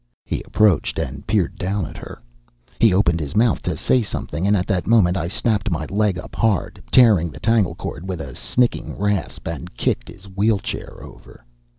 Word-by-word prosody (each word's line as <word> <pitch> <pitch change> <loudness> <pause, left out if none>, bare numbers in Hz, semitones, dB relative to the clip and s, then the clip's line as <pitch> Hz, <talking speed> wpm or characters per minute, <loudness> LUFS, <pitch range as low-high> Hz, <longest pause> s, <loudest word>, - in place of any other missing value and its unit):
He - - -3
approached 105 -5 +2
and 70 +2 -4
peered 100 -5 0
down 95 0 -1
at - - -9
her. - - -9 0.6
He 115 - +5
opened 90 -3 +2
his 75 -3 -5
mouth 115 0 +3
to - - -3
say 130 - +2
something, 95 -4 -3
and 105 0 +4
at 90 - -1
that 95 -4 -1
moment 100 -6 +4
I 85 -2 -1
snapped 105 +3 0
my 80 -3 -2
leg 100 -2 +1
up - - -9
hard, 110 -6 0
tearing 105 -9 +6
the 75 - -11
tangle 110 0 +2
cord 85 +7 -6
with 90 -3 -3
a - - -7
snicking 125 -1 -1
rasp, 100 -4 -2
and - - -6
kicked - - -1
his 95 - -13
wheelchair 100 +1 -2
over. - - -14
95 Hz, 190 wpm, -21 LUFS, 85-110 Hz, 0.6 s, tearing